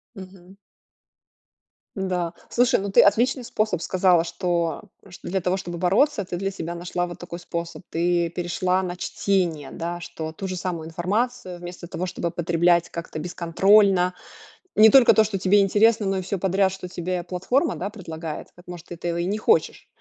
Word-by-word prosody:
Мгм. 190 Hz, -1 st, -13 dB, 1.4 s
М-да, 180 Hz, -3 st, -2 dB, 0.2 s
слушай, 245 Hz, -3 st, +3 dB
ну, 200 Hz, +1 st, -3 dB
ты -, -, +6 dB
отличный 245 Hz, +6 st, +3 dB
способ 215 Hz, -6 st, -1 dB
сказала, 180 Hz, -2 st, +3 dB
что, 170 Hz, -2 st, -2 dB, 0.3 s
чт 175 Hz, -, -13 dB
для 190 Hz, +2 st, -2 dB
того, 180 Hz, +1 st, 0 dB
чтобы 175 Hz, -2 st, -6 dB
бороться, 200 Hz, -, +2 dB
ты 175 Hz, -1 st, -5 dB
для 195 Hz, +2 st, -2 dB
себя 170 Hz, -3 st, -5 dB
нашла 175 Hz, +1 st, -3 dB
вот 175 Hz, -, -9 dB
такой 170 Hz, -1 st, -7 dB
способ. 170 Hz, 0 st, -6 dB
Ты 170 Hz, 0 st, 0 dB
перешла 180 Hz, +2 st, -1 dB
на 180 Hz, -1 st, -4 dB
чтение, 175 Hz, -7 st, -1 dB
да, 170 Hz, +1 st, -5 dB
что 160 Hz, -2 st, -6 dB
ту 190 Hz, +3 st, -6 dB
же 185 Hz, -, -4 dB
самую 175 Hz, -3 st, -4 dB
информацию, 185 Hz, +3 st, -2 dB
вместо 175 Hz, 0 st, -8 dB
того, 180 Hz, +1 st, -4 dB
чтобы 170 Hz, -2 st, -3 dB
потреблять 170 Hz, 0 st, +2 dB
как-то 165 Hz, -2 st, -6 dB
бесконтрольно, 180 Hz, +2 st, +3 dB, 0.6 s
не 220 Hz, +1 st, +8 dB
только 260 Hz, 0 st, +7 dB
то, 220 Hz, -, +5 dB
что 205 Hz, -2 st, -2 dB
тебе 195 Hz, +2 st, +4 dB
интересно, 210 Hz, +2 st, +3 dB
но 195 Hz, -, 0 dB
и 185 Hz, -, -1 dB
всё 195 Hz, +1 st, -3 dB
подряд, 190 Hz, +1 st, +2 dB
что 190 Hz, -1 st, -7 dB
тебе 180 Hz, 0 st, -3 dB
платформа, 190 Hz, -, 0 dB
да, 195 Hz, +3 st, -4 dB
предлагает. 165 Hz, -6 st, -7 dB
Так, 175 Hz, -, -17 dB
может, 175 Hz, -1 st, -9 dB
ты 175 Hz, -, -7 dB
этого 170 Hz, 0 st, -3 dB
и 170 Hz, -, -1 dB
не 205 Hz, +4 st, -1 dB
хочешь. 445 Hz, -, +1 dB
180 Hz, 175 wpm, -24 LUFS, 170-195 Hz, 1.4 s, не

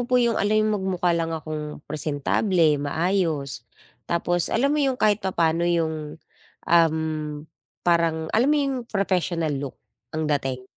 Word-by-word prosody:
po 250 Hz, -, 0 dB
yung 235 Hz, -2 st, +2 dB
ala'y 215 Hz, +1 st, +2 dB
magmukha 190 Hz, -4 st, 0 dB
lang 165 Hz, -1 st, -1 dB
akong 150 Hz, -1 st, -6 dB
presentable, 155 Hz, +2 st, +1 dB
maayos, 150 Hz, -5 st, -1 dB, 0.4 s
tapos 175 Hz, 0 st, 0 dB
alam 275 Hz, +5 st, +2 dB
mo 300 Hz, -, +1 dB
yung 270 Hz, -2 st, +2 dB
kahit 210 Hz, -1 st, +4 dB
papano 170 Hz, -3 st, +1 dB
yung, 160 Hz, -3 st, -1 dB, 0.5 s
um, 165 Hz, -2 st, +4 dB, 0.9 s
parang 165 Hz, -2 st, +2 dB
alam 240 Hz, +6 st, +3 dB
mo 300 Hz, -, +4 dB
yung 275 Hz, -1 st, 0 dB
professional 180 Hz, -5 st, 0 dB
look, 135 Hz, -1 st, -5 dB, 0.4 s
ang 155 Hz, -, -1 dB
dating? 135 Hz, -3 st, -1 dB
170 Hz, 135 wpm, -24 LUFS, 155-195 Hz, 0.9 s, kahit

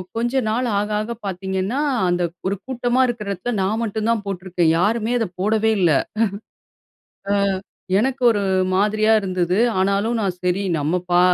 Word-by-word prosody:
கொஞ்ச 235 Hz, +2 st, -1 dB, 0.2 s
நாள் 245 Hz, +3 st, 0 dB
ஆக 210 Hz, +1 st, -2 dB
ஆக 220 Hz, +2 st, -5 dB, 0.2 s
பார்த்தீங்கன்னா, 190 Hz, +6 st, -2 dB, 0.3 s
அந்த 175 Hz, 0 st, +1 dB, 0.2 s
ஒரு 195 Hz, -, 0 dB
கூட்டமா 245 Hz, 0 st, +1 dB
இருக்கிற 235 Hz, -4 st, -4 dB
இடத்தில 200 Hz, +6 st, -3 dB
நான் 215 Hz, +4 st, 0 dB
மட்டும் 220 Hz, 0 st, -2 dB
தான் 220 Hz, -3 st, -1 dB
போட்டுருக்கேன். 180 Hz, -3 st, 0 dB
யாருமே 220 Hz, +4 st, +1 dB
அதை 225 Hz, -, 0 dB
போடவே 220 Hz, +2 st, +2 dB
இல்ல. 170 Hz, -3 st, +4 dB, 1.4 s
அ -, -, +3 dB, 0.7 s
எனக்கு 260 Hz, +3 st, -1 dB
ஒரு 210 Hz, -3 st, +2 dB, 0.3 s
மாதிரியா 215 Hz, +2 st, +2 dB
இருந்தது. 185 Hz, -2 st, -1 dB, 0.2 s
ஆனாலும் 200 Hz, +4 st, +1 dB
நான் 195 Hz, -4 st, -1 dB
"சரி 180 Hz, +2 st, +1 dB, 0.2 s
நம்ம 160 Hz, +4 st, 0 dB
பா 175 Hz, -, +5 dB
205 Hz, 150 wpm, -21 LUFS, 185-230 Hz, 1.4 s, பா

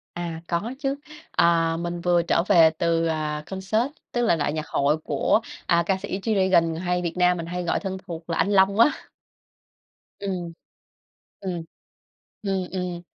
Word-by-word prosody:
À, 170 Hz, -2 st, -4 dB
có 205 Hz, +9 st, -2 dB
chứ. 275 Hz, -1 st, -1 dB, 0.4 s
À, 165 Hz, -1 st, +3 dB
mình 170 Hz, 0 st, -4 dB
vừa 175 Hz, -1 st, +3 dB
trở 170 Hz, 0 st, +1 dB
về 165 Hz, -5 st, +7 dB
từ, 165 Hz, -1 st, +1 dB
à, 150 Hz, -1 st, -2 dB
concert, 195 Hz, -, -1 dB, 0.2 s
tức 240 Hz, -, 0 dB
là 225 Hz, -8 st, +3 dB
đại 150 Hz, -2 st, -1 dB
nhạc 155 Hz, 0 st, -4 dB
hội 145 Hz, +2 st, +2 dB
của, 160 Hz, +6 st, +1 dB, 0.3 s
à, 170 Hz, 0 st, +3 dB
ca 190 Hz, +1 st, +1 dB
sĩ 190 Hz, 0 st, -4 dB
G-Dragon 190 Hz, -6 st, +2 dB
hay 180 Hz, 0 st, 0 dB
Việt 170 Hz, -1 st, -2 dB
Nam 180 Hz, 0 st, +4 dB
mình 165 Hz, -, -4 dB
hay 180 Hz, +1 st, -4 dB
gọi 170 Hz, -, 0 dB
thân 190 Hz, -1 st, -4 dB
thuộc 165 Hz, 0 st, -7 dB
là 165 Hz, -, -1 dB
anh -, -, +2 dB
Long 195 Hz, +1 st, +4 dB
á. 235 Hz, -, +7 dB, 1.3 s
Ừm. 180 Hz, -4 st, -4 dB, 0.9 s
Ừm. 180 Hz, -4 st, -3 dB, 0.8 s
Ừm, 195 Hz, -2 st, -1 dB
ừm. 180 Hz, -2 st, -3 dB
175 Hz, 170 wpm, -24 LUFS, 165-190 Hz, 1.3 s, về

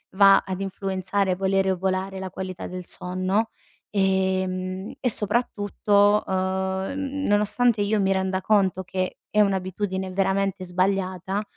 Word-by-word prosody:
va 195 Hz, 0 st, +7 dB
ad 190 Hz, 0 st, -4 dB
influenzare, 195 Hz, 0 st, -1 dB
volere 190 Hz, 0 st, +1 dB
o 185 Hz, -, -1 dB
volare, 190 Hz, +1 st, -2 dB
la 190 Hz, 0 st, -5 dB
qualità 185 Hz, 0 st, -6 dB
del 180 Hz, 0 st, -7 dB
sonno, 185 Hz, +6 st, -1 dB, 0.4 s
ehm, 190 Hz, -1 st, 0 dB
e 250 Hz, -, +1 dB
soprattutto, 205 Hz, -2 st, +2 dB
uhm, -, -, -3 dB, 0.6 s
n 280 Hz, 0 st, -3 dB
nonostante 210 Hz, +2 st, +2 dB
io 205 Hz, +1 st, +1 dB
mi 195 Hz, 0 st, +2 dB
renda 190 Hz, 0 st, 0 dB
conto 190 Hz, -2 st, +2 dB
che 185 Hz, 0 st, -3 dB
è 210 Hz, -, +3 dB
un'abitudine 190 Hz, -1 st, -1 dB
veramente 195 Hz, 0 st, 0 dB
sbagliata, 190 Hz, +1 st, -1 dB
190 Hz, 130 wpm, -24 LUFS, 185-205 Hz, 0.6 s, va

